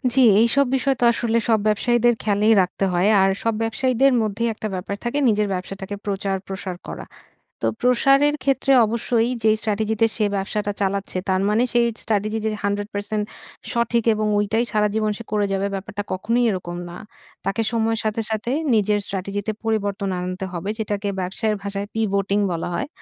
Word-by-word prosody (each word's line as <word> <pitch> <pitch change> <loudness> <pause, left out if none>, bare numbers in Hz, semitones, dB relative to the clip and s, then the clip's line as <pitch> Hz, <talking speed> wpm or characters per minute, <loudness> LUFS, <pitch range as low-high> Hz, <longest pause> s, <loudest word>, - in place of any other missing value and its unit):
জ্বি, 265 - +5 0.2
এইসব 240 +5 +4
বিষয় 270 +1 +1
তো - - +2
আসলে 230 -1 0
সব 220 - +4
ব্যবসায়ীদের 240 +3 +3
খেয়ালেই 210 +1 +3
রাখতে 185 +2 -1
হয়। 175 +3 +2
আর 195 - +4
সব 230 - +1
ব্যবসায়ীদের 255 +4 +2
মধ্যেই 220 +2 -1
একটা 215 - -5
ব্যাপার 185 +2 -4
থাকে 240 +4 -2
নিজের 210 -1 +2
ব্যবসাটাকে 190 +2 -5
প্রচার 195 -1 -1
প্রসার 190 -1 -5
করা। - - -6 0.6
তো - - +3
প্রসারের 275 +4 +4
ক্ষেত্রে 270 0 +2
অবশ্যই 230 +1 0
যে 220 - +5
স্ট্র্যাটেজিতে 220 +1 +1
সে 215 - +2
ব্যবসাটা 205 +1 -2
চালাচ্ছে, 195 -1 -1
তার 190 0 +2
মানে, 215 +3 +3
সেই 240 -1 +4 0.2
স্ট্র্যাটেজি 215 +1 0
যে 220 - +1
100% 205 +1 -2 0.5
সঠিক 235 -1 +1
এবং 215 0 -1
ঐটাই 220 +3 +1
সারাজীবন 215 0 +1
সে 230 - -8
করে 210 -1 +2
যাবে 195 +1 0
ব্যাপারটা 205 +1 -5
কখনোই 230 +6 +1
এরকম 175 -2 -4
না। 175 - -8 0.5
তাকে 195 +3 0
সময়ের 225 -1 0
সাথে, 215 +1 0
সাথে 220 +2 -2 0.2
নিজের 210 -1 +2
স্ট্র্যাটেজিতে 200 +2 -3
পরিবর্তন 200 -3 -1
আনতে 185 +1 -4
হবে, 175 +3 -4
যেটাকে 205 -1 -2
ব্যবসায়ের 210 +4 -1
ভাষায় 200 0 -4
pivoting 200 -2 +1
বলা 170 0 -3
হয়। - - -2
210 Hz, 165 wpm, -22 LUFS, 200-230 Hz, 0.6 s, জ্বি